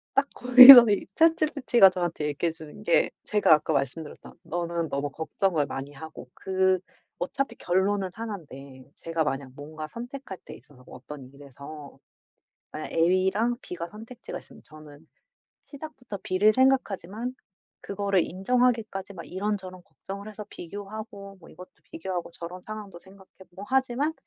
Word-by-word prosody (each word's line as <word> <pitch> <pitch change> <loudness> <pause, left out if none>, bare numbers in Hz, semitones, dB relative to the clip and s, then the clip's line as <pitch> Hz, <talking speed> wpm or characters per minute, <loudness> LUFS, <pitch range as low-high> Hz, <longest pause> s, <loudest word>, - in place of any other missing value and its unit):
딱 280 0 +2
거기서 250 0 +11
이 200 - 0
ChatGPT가 300 -10 +4
저한테 175 -4 -3
얘기해 150 +3 -1
주는 160 -2 -12
게 - - +3 0.2
제가 210 -6 +4
아까 155 0 +1
말씀드렸던 150 +4 -5
너는 170 0 -3
너무 140 0 -3
걱정을 160 +1 -1
많이 140 +1 -6
하고 150 -3 -11
그 190 -1 +1 0.4
어차피 235 +7 -3
결론은 190 +1 0
1 220 -1 -5
인데 135 -4 -13
제가 165 -1 -2
만약 135 -2 -3
뭔가 155 +2 -8
선택할 245 - -8
때 - - -10
있어서 125 -3 -19
어떤 135 -4 -11
일에서 140 +1 -12 0.8
예 155 - -6
A랑 190 +8 +2
B가 170 -1 -6
선택지가 225 +5 -9
있으면 - - -16
저는 155 0 -15 0.6
시작부터 270 -8 -9
B를 200 +4 +3
생각하지만 245 -3 0 0.5
그거를 200 -2 0
인정하기까지 220 0 -1
막 170 -3 -9
이런저런 185 -1 -4
걱정을 200 +1 -9
해서 210 -1 -9
비교하고 200 +1 -9
뭐 165 - -16
이것도 180 - -13 0.2
비교하고 180 0 -5
저런 175 +2 -9
상황도 210 -4 -9
생각해 190 0 -18 0.2
보고 190 +3 -11
하지만 265 +4 0
190 Hz, 340 characters per minute, -26 LUFS, 160-220 Hz, 0.8 s, 거기서